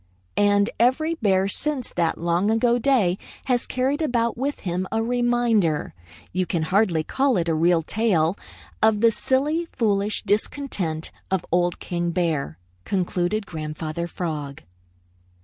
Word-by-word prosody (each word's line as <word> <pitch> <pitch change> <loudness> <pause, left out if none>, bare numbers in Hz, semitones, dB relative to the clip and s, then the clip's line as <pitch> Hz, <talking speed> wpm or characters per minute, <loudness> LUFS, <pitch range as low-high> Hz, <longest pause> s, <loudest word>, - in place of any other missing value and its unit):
"] 90 - -40 0.2
"And 200 0 +3
every 260 +8 +3
bear 195 - +2
since 270 +4 -2
that 170 -2 0
long 170 +4 +1
ago 235 +2 +3
day 225 -9 +2 0.3
has 245 -2 +1
carried 265 +4 0
about 235 -6 +1
with 275 +4 -3
him 185 0 -2
a 225 0 0
reminder 240 -8 +1 0.4
you 185 0 0
can 170 -4 -1
hardly 180 -1 +2
call 270 - +1
it 170 -1 0
a 165 - +2
real 165 +1 +3
tail 185 -4 +1 0.5
of 220 -1 +3
the 230 -1 +6
silly, 295 +8 0
foolish 210 -6 0
discontent 205 - -1 0.2
of 190 -2 -1
Old 175 0 +1
King 175 -1 -2
Bear," 165 - -1 0.3
concluded 185 - -1
Grandfather 155 0 -4
Frog. 150 -6 -5
200 Hz, 140 wpm, -24 LUFS, 170-240 Hz, 0.5 s, the